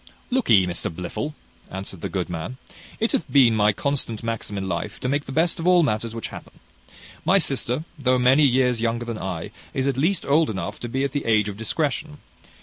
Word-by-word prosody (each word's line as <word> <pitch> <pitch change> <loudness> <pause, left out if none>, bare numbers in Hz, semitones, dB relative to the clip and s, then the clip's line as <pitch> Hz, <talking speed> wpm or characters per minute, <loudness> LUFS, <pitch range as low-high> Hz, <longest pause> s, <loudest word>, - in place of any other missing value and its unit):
"Look'ee, 115 - +4
Mr 90 0 -2
Blifil," 90 - -5 0.3
answered 95 -2 -6
the - - -3
good 95 -3 -2
man, 90 +9 -5 0.4
"it 225 - +1
hath - - -1
been 125 -5 +6
my 105 0 +4
constant 115 -1 -2
maxim 115 -3 -3
in 95 -1 -3
life 95 +4 -3
to - - -1
make 145 +2 0
the - - -7
best 160 +5 +1
of 165 - -2
all 180 -1 +6
matters 115 -3 -1
which 115 - -4
happen. - - -10 0.7
My 190 - +5
sister, 135 -4 +1 0.2
though 130 -2 +3
many 125 +4 +5
years 125 -3 +3
younger 120 +1 0
than 115 -2 -4
I, 90 -3 -4 0.2
is 130 - 0
at 135 -2 0
least 170 +8 +1
old 155 +3 +3
enough 95 -5 -4
to 120 - -5
be 135 +3 -1
at 140 - 0
the 145 - -3
age 105 -2 +3
of 100 - -6
discretion. 150 +6 -2
120 Hz, 210 wpm, -24 LUFS, 105-145 Hz, 0.7 s, been